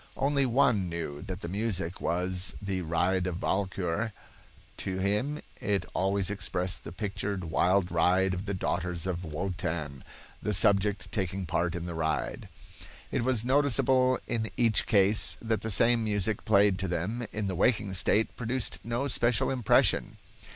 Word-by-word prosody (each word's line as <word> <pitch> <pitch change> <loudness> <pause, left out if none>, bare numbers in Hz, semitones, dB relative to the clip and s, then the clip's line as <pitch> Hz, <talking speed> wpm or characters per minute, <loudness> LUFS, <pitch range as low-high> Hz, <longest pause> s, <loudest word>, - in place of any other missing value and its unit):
Only 140 0 +1
one 120 -7 +2
knew 80 -4 -5
that 95 +1 -6
the - - -5
music 95 -2 -2
was 90 +2 0
the 95 -2 -3
"Ride 90 +3 0
of 90 -1 -3
Walkure." 95 +2 -1 0.6
"To 95 -1 -4
him 105 +11 -1 0.2
it 100 -3 -1
always 95 +1 +1
expressed 95 -2 -1
the - - -8
pictured 100 0 -4
wild 90 +3 +1
ride 90 +3 +3
of 90 +2 -4
the 100 -1 -2
daughters 90 -1 -2
of 90 -1 -3
Wotan, 80 -4 -4 0.4
the 105 -1 +1
subject 100 0 +2
taking 95 -1 -2
part 85 +1 -1
in 85 -1 -4
the 85 - -5
ride." 80 -1 -2 0.6
It - - 0
was 120 -3 0
noticeable 130 -1 +3
in 110 -2 -2
each 115 -3 +2
case 100 +1 +3
that 110 -1 -1
the 110 - -4
same 115 +3 +4
music 105 0 -1
played 100 -3 +4
to 95 - -1
them 105 +8 -3
in 105 0 -3
the 95 - -2
waking 100 +1 +1
state 105 +4 +2
produced 120 -1 -2
no 120 +4 -2
special 120 -4 +2
impression. 125 -5 +2
100 Hz, 155 wpm, -29 LUFS, 90-110 Hz, 0.6 s, same